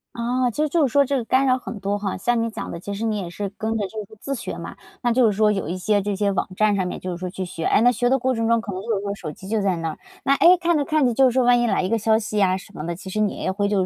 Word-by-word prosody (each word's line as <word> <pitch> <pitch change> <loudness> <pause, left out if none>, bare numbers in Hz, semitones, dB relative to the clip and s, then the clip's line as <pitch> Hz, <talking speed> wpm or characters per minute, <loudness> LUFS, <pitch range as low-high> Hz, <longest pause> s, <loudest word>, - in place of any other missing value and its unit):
哦， 245 +1 0
其 300 - -1
实 310 - +2
就 300 -2 +3
是 - - -7
说 280 +2 +4
这 280 - -1
个 240 - -2
干 260 +4 +2
扰 255 -1 +3
很 230 -4 -7
多 200 +1 -1
哈。 200 -2 -3
像 240 +4 +1
你 230 - -1
讲 - - -6
的， 170 - -6
其 200 +3 -6
实 225 +3 -3
你 215 -2 0
也 180 -3 -5
是 200 +3 -4
跟 225 0 -1
着 205 -3 -1
就 215 +2 -6
是 215 - -16
自 275 - -4
学 235 - -5
嘛， - - -7 0.3
那 240 -1 +2
就 245 -1 +4
是 215 - +3
说 215 -1 +4
有 195 -6 -2
一 180 - -3
些 205 +3 +1
这 200 0 -2
些 200 0 +1
网 - - -1
站 215 0 +3
上 185 -2 0
面 - - -5
就 185 - -5
是 175 - -4
说 180 0 -4
去 185 +1 -5
学， 165 -2 -6
诶， - - +4
那 245 - +6
学 245 +1 0
的 265 - +3
过 260 0 0
程 225 -1 -1
中 230 0 +3
可 205 -3 -5
能 185 - -4
就 225 0 -1
是 195 - -2
说 200 0 -2
手 155 -6 -6
机 190 - -12
就 215 0 0
在 195 -2 +1
那 165 -1 -2
儿， - - -8 0.2
那 275 - +3
诶， 355 +4 +6
看 345 -1 +1
着 290 - +1
看 305 -1 +2
着 245 - +2
就 270 +3 +4
是 - - -2
说 260 0 +2
万 245 0 +4
一 240 - +1
来 - - +1
一 185 - -1
个 230 - +2
消 220 +1 +3
息 215 -1 -2
呀 185 -2 +3
什 190 - -13
么 150 - -7
的， 170 - -3
其 185 - -11
实 215 - -2
你 210 -2 +1
也 190 - -2
会 200 +1 -1
就 195 -3 +1
215 Hz, 395 characters per minute, -22 LUFS, 195-245 Hz, 0.3 s, 那